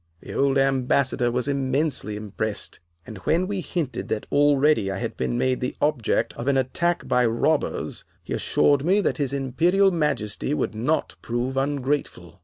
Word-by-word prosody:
The -, -, -9 dB
old 140 Hz, 0 st, +2 dB
Ambassador 135 Hz, -1 st, +2 dB
was 125 Hz, +2 st, -1 dB
immensely 135 Hz, -4 st, 0 dB
impressed, 105 Hz, 0 st, -4 dB, 0.3 s
and 110 Hz, -, -9 dB
when 165 Hz, -, +1 dB
we 195 Hz, -1 st, -3 dB
hinted 155 Hz, -8 st, -3 dB
that 105 Hz, -, -2 dB
already 145 Hz, -6 st, +3 dB
I 95 Hz, -, -3 dB
had -, -, -4 dB
been 60 Hz, -2 st, -2 dB
made 130 Hz, -1 st, 0 dB
the 125 Hz, -, -2 dB
object 145 Hz, -7 st, +1 dB
of 120 Hz, -, -6 dB
an 140 Hz, -1 st, +3 dB
attack 170 Hz, +7 st, 0 dB
by 125 Hz, 0 st, +3 dB
robbers, 115 Hz, -, -1 dB, 0.2 s
he -, -, -5 dB
assured 145 Hz, -2 st, +2 dB
us 190 Hz, +7 st, +2 dB
that -, -, 0 dB
his 140 Hz, -4 st, -1 dB
Imperial 165 Hz, +9 st, +2 dB
Majesty 150 Hz, -, -1 dB
would -, -, -1 dB
not 125 Hz, +9 st, -1 dB
prove 120 Hz, +3 st, -2 dB
ungrateful. 135 Hz, -, -2 dB
135 Hz, 165 wpm, -24 LUFS, 120-150 Hz, 0.3 s, already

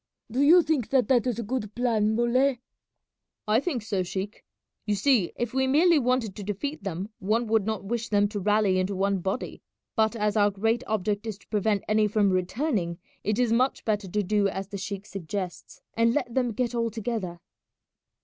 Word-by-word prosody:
"Do 255 Hz, +4 st, 0 dB
you 335 Hz, +5 st, +7 dB
think 290 Hz, -8 st, 0 dB
that 260 Hz, -5 st, +3 dB
that 255 Hz, -1 st, +3 dB
is 245 Hz, -, -1 dB
a 235 Hz, -, -3 dB
good 215 Hz, -2 st, -4 dB
plan, 220 Hz, -3 st, +1 dB
Muley?" 245 Hz, +2 st, +2 dB, 0.9 s
"I 215 Hz, +2 st, +4 dB
think 270 Hz, -, -2 dB
so, 200 Hz, -3 st, -1 dB
sheik. 190 Hz, +4 st, -5 dB, 0.4 s
You 210 Hz, -, +2 dB
see, 210 Hz, -3 st, +2 dB
if 240 Hz, -1 st, -3 dB
we 265 Hz, 0 st, +2 dB
merely 320 Hz, +4 st, +5 dB
wanted 250 Hz, -5 st, 0 dB
to 205 Hz, -, -7 dB
defeat 210 Hz, +7 st, -4 dB
them 195 Hz, +1 st, -4 dB
one 220 Hz, +5 st, +1 dB
would 220 Hz, -2 st, +1 dB
not 220 Hz, -2 st, -2 dB
wish 230 Hz, +3 st, -3 dB
them 205 Hz, -1 st, +3 dB
to 205 Hz, -, -4 dB
rally 205 Hz, -1 st, +2 dB
into 190 Hz, +2 st, -1 dB
one 195 Hz, 0 st, +1 dB
body; 190 Hz, +7 st, -4 dB, 0.3 s
but 220 Hz, 0 st, +2 dB
as 210 Hz, -1 st, 0 dB
our 205 Hz, -1 st, +4 dB
great 225 Hz, +4 st, 0 dB
object 210 Hz, +1 st, -1 dB
is 215 Hz, -3 st, -4 dB
to -, -, -24 dB
prevent 210 Hz, -1 st, +1 dB
any 215 Hz, 0 st, +3 dB
from 205 Hz, -1 st, +2 dB
returning, 185 Hz, -, -1 dB, 0.3 s
it 210 Hz, +1 st, 0 dB
is 245 Hz, -2 st, +2 dB
much 255 Hz, +3 st, +1 dB
better 210 Hz, -3 st, 0 dB
to 210 Hz, +3 st, -1 dB
do 205 Hz, +1 st, +2 dB
as 195 Hz, 0 st, -4 dB
the 200 Hz, -, -5 dB
sheik 200 Hz, +1 st, -5 dB
suggests 185 Hz, -2 st, -6 dB
and 230 Hz, +1 st, +2 dB
let 250 Hz, -5 st, -1 dB
them 250 Hz, -2 st, +1 dB
get 245 Hz, +2 st, -1 dB
all 230 Hz, -1 st, 0 dB
together." 215 Hz, -6 st, -4 dB
215 Hz, 195 wpm, -26 LUFS, 200-240 Hz, 0.9 s, you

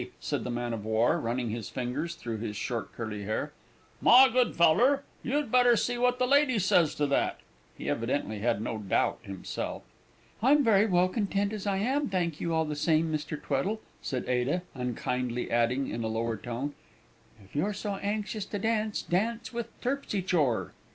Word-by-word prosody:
said -, -, -2 dB
the -, -, -4 dB
man 120 Hz, 0 st, -2 dB
of 110 Hz, -2 st, -4 dB
war, 110 Hz, +2 st, +2 dB
running 120 Hz, 0 st, -2 dB
his 115 Hz, -2 st, -5 dB
fingers 135 Hz, +7 st, -3 dB
through 115 Hz, -9 st, -5 dB
his 105 Hz, -1 st, -4 dB
short 115 Hz, +2 st, -3 dB
curly 110 Hz, -3 st, -5 dB
hair; 110 Hz, +2 st, -2 dB, 0.5 s
"my 260 Hz, +2 st, +8 dB
good 250 Hz, -1 st, +2 dB
feller, 240 Hz, -, +4 dB, 0.2 s
you'd 285 Hz, -1 st, -1 dB
better 245 Hz, -1 st, +6 dB
see 245 Hz, +2 st, 0 dB
what 250 Hz, +1 st, +2 dB
the 255 Hz, -, +2 dB
lady 280 Hz, -1 st, +4 dB
says 175 Hz, -5 st, +3 dB
to 150 Hz, -, +1 dB
that!" 140 Hz, -1 st, 0 dB, 0.4 s
(He -, -, -7 dB
evidently 110 Hz, -1 st, -1 dB
had 105 Hz, -1 st, 0 dB
no 115 Hz, -2 st, -3 dB
doubt 100 Hz, -3 st, 0 dB
himself.) 95 Hz, -2 st, -5 dB, 0.6 s
"I'm 285 Hz, +5 st, +5 dB
very 215 Hz, -3 st, +4 dB
well 180 Hz, -2 st, +3 dB
content 200 Hz, 0 st, -1 dB
as 210 Hz, -1 st, -4 dB
I 195 Hz, -1 st, +1 dB
am, 265 Hz, +7 st, 0 dB
thank 175 Hz, -5 st, -1 dB
you 170 Hz, -, -1 dB
all 160 Hz, -1 st, +2 dB
the 150 Hz, -1 st, -3 dB
same, 155 Hz, +1 st, +2 dB
Mr. 150 Hz, 0 st, -3 dB
Tweddle," 150 Hz, +11 st, -1 dB, 0.2 s
said 130 Hz, -2 st, -3 dB
Ada, 125 Hz, +8 st, 0 dB
unkindly 125 Hz, -1 st, -2 dB
adding 120 Hz, +3 st, +2 dB
in 115 Hz, -, -3 dB
a -, -, -1 dB
lower 115 Hz, +1 st, -1 dB
tone, 120 Hz, +7 st, -4 dB, 0.7 s
"If 95 Hz, -, -21 dB
you're 165 Hz, +9 st, +1 dB
so 205 Hz, 0 st, -4 dB
anxious 210 Hz, +1 st, -3 dB
to 205 Hz, -, -4 dB
dance, 215 Hz, 0 st, 0 dB
dance 225 Hz, +7 st, -1 dB
with 235 Hz, -1 st, -3 dB
Terpsy 250 Hz, -7 st, -1 dB
chore!" 150 Hz, -11 st, +1 dB
165 Hz, 180 wpm, -29 LUFS, -, 0.7 s, my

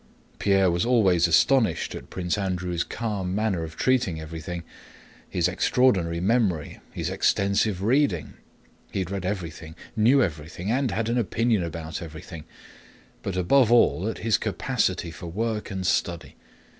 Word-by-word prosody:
Pierre 95 Hz, -2 st, +3 dB
was 85 Hz, 0 st, 0 dB
always 95 Hz, -8 st, +4 dB
astonished 115 Hz, +8 st, +3 dB
at -, -, -9 dB
Prince 90 Hz, -2 st, -2 dB
Andrew's 90 Hz, -3 st, -2 dB
calm 100 Hz, -5 st, -3 dB
manner 105 Hz, -5 st, 0 dB
of 80 Hz, 0 st, -7 dB
treating 120 Hz, -11 st, +1 dB
everybody, 80 Hz, +2 st, -6 dB, 0.7 s
his 85 Hz, -1 st, +1 dB
extraordinary 90 Hz, -3 st, +2 dB
memory, 95 Hz, -6 st, 0 dB
his -, -, -3 dB
extensive 100 Hz, -1 st, +1 dB
reading 115 Hz, -, +1 dB, 0.6 s
(he -, -, -4 dB
had 95 Hz, -1 st, -2 dB
read 95 Hz, -2 st, -3 dB
everything, 85 Hz, -4 st, -5 dB, 0.2 s
knew 120 Hz, +5 st, +5 dB
everything, 85 Hz, +4 st, -4 dB
and 130 Hz, +1 st, +1 dB
had 110 Hz, +2 st, -1 dB
an 120 Hz, +1 st, +1 dB
opinion 115 Hz, -2 st, +1 dB
about 80 Hz, -1 st, -5 dB
everything), 80 Hz, 0 st, -9 dB, 0.8 s
but 95 Hz, -, -4 dB
above 115 Hz, +7 st, +4 dB
all 115 Hz, -5 st, +4 dB
at -, -, -5 dB
his 110 Hz, -1 st, +1 dB
capacity 85 Hz, -, -1 dB
for 85 Hz, -, -9 dB
work 110 Hz, +4 st, -2 dB
and 95 Hz, -1 st, -4 dB
study. 85 Hz, -4 st, -1 dB
95 Hz, 145 wpm, -25 LUFS, 85-110 Hz, 0.8 s, knew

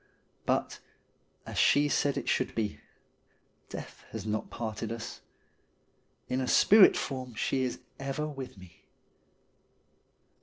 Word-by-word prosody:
But, -, -, 0 dB, 0.7 s
as -, -, -3 dB
she 145 Hz, +1 st, +5 dB
said 145 Hz, -1 st, +1 dB
it -, -, -4 dB
should -, -, 0 dB
be, 110 Hz, -2 st, -2 dB, 0.9 s
death -, -, -8 dB
has 110 Hz, -2 st, -5 dB
not 110 Hz, 0 st, -2 dB
parted 110 Hz, -1 st, -4 dB
us. 115 Hz, -1 st, -6 dB, 1.1 s
In 130 Hz, +1 st, 0 dB
a 130 Hz, -, -1 dB
spirit 205 Hz, -, +7 dB
form 130 Hz, -3 st, -4 dB
she 130 Hz, +4 st, 0 dB
is 125 Hz, -1 st, -1 dB, 0.2 s
ever 135 Hz, +2 st, -2 dB
with 135 Hz, -7 st, -7 dB
me. 95 Hz, -3 st, -16 dB
125 Hz, 120 wpm, -30 LUFS, 110-135 Hz, 1.1 s, spirit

